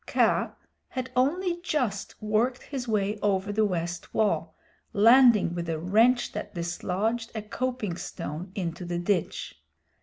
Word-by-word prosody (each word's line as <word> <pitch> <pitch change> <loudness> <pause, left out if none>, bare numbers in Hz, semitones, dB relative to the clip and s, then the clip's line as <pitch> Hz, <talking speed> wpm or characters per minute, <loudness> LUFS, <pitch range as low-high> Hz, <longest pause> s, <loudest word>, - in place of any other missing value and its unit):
Kaa - - +2 0.4
had 255 0 -4
only 345 +7 +1
just 250 - -2
worked 220 +4 0
his 265 -3 -5
way 210 -1 0
over 200 -1 +1
the 215 +1 +2
west 175 -3 -3
wall, 215 -1 +1 0.4
landing 230 -3 +6
with 170 -1 -4
a 160 - -1
wrench 225 +9 +3
that - - -6
dislodged 195 +7 -2
a 220 - -2
coping 220 -4 -3
stone 170 +1 -6
into 175 -2 -3
the 175 0 -3
ditch. 175 0 -2
210 Hz, 140 wpm, -27 LUFS, 180-245 Hz, 0.4 s, landing